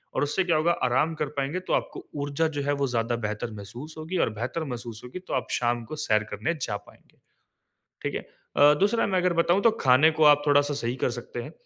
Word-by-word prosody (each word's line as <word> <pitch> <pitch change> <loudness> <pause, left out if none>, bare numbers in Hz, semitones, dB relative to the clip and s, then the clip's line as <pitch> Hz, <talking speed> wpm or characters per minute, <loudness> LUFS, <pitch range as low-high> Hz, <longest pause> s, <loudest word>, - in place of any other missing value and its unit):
और - - +1
उससे 145 +6 +1
क्या 170 -3 +2
होगा 160 +3 +3 0.2
आराम 130 +6 +1
कर 150 - +1
पाएँगे 140 +6 -1
तो - - 0
आपको - - -2 0.2
ऊर्जा 145 +3 0
जो - - 0
है 145 +1 +1
वो 140 - +2
ज़्यादा 120 -1 0
बेहतर 105 +2 -4
महसूस 120 +10 -8
होगी 160 +4 -4
और - - -2
बेहतर 130 +8 -2
महसूस 120 -5 -6
होगी 125 +8 -7
तो - - -4
आप 130 - -1
शाम 120 -1 0
को 155 - -7
सैर 110 -1 +3
करने 105 +11 -1
जा 105 - -2
पाएँगे, 105 - -21 0.9
ठीक - - -3
है? - - -2 0.4
अ, 145 +1 +7
दूसरा 210 +4 +3
मैं 190 -2 +1
अगर 180 0 +2
बताऊँ 180 +4 +2
तो 230 - +6
खाने 130 +5 +6
को - - +7
आप 145 -1 +6
थोड़ा-सा 145 0 +3
सही 120 -3 -2
कर - - +2
सकते 120 0 -6
हैं, 145 - -9
140 Hz, 230 wpm, -26 LUFS, 120-160 Hz, 0.9 s, अ